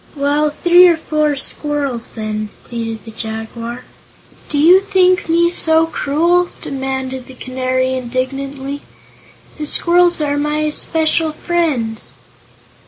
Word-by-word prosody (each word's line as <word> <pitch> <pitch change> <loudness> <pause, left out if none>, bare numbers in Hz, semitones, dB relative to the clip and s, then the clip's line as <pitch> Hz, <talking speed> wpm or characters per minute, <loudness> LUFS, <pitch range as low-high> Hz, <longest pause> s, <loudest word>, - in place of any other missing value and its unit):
"Well, 290 +1 +1
three 350 +4 +6
or 340 -2 +3
four 305 -2 0
squirrels, 280 -3 -4
then," 215 -1 -4
pleaded 225 -2 -5
the 225 - -9
Jaguar. 225 +2 -6 0.7
"Do 295 - -2
you 340 +6 +7
think 370 -3 +2
me 340 +1 +4
so 320 -2 +4
cruel?" 335 +3 +1
demanded 265 -1 -4
the 260 - -12
Canary, 255 0 -1
indignantly. 270 +2 -4 0.8
"The 300 - -3
squirrels 350 +2 +3
are 290 -1 0
my 300 +1 0
especial 315 +1 0
friends." 290 -11 -1
285 Hz, 115 wpm, -17 LUFS, 255-325 Hz, 0.8 s, you